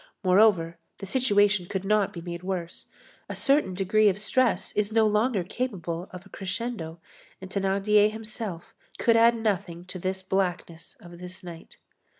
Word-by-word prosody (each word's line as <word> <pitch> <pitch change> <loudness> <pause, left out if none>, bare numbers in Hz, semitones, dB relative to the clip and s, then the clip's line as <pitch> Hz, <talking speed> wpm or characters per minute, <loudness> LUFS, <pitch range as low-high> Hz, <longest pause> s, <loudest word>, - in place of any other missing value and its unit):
Moreover, 185 -3 +3 0.2
the 195 - -7
situation 205 -5 +2
could 190 0 -4
not 210 -1 +2
be 170 - -8
made 170 0 -6
worse, 180 -2 -5 0.4
a - - -4
certain 275 -10 +2
degree 205 +3 +3
of 190 - 0
distress 235 +4 +1
is 210 0 -1
no 220 0 +4
longer 210 -1 +1
capable 180 -5 -4
of 180 +1 -10
a - - -16
crescendo, 195 -4 -5 0.4
and 190 0 -10
Thénardier 200 +2 +3
himself 215 -5 -6 0.2
could 230 -2 +3
add 230 +1 +5
nothing 195 -6 -2
to 185 0 -5
this 190 +1 -3
blackness 180 -3 -3
of 175 0 -12
this 180 +1 -9
night. 170 -2 -11
195 Hz, 160 wpm, -26 LUFS, 180-215 Hz, 0.4 s, add